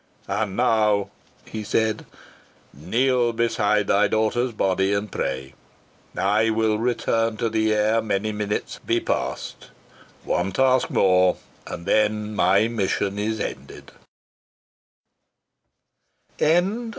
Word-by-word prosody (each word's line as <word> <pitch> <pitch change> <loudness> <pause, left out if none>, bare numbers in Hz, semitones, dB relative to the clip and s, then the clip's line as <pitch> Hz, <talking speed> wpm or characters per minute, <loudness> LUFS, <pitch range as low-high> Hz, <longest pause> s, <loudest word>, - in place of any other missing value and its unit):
"And 100 0 -2
now," 110 -4 +2 0.3
he 110 -1 -6
said, 110 +1 -1 0.7
"kneel 120 - +1
beside 110 -3 +1
thy 100 +1 +3
daughter's 115 +3 0
body 95 -2 0
and 100 0 -3
pray. 65 0 -4 0.6
I 105 +4 +2
will 110 -1 +1
return 115 -1 0
to 115 0 -1
thee 110 0 +1
ere 110 +2 +2
many 110 0 -1
minutes 105 0 -3
be - - +1
passed. - - -4 0.5
One 90 +2 -1
task 130 +1 +2
more, 90 -1 +3 0.3
and 85 - -7
then 105 +1 +1
my 100 +4 +3
mission 100 -2 -1
is 110 +1 -2
ended." - - -7
110 Hz, 105 wpm, -23 LUFS, 100-115 Hz, 0.7 s, thy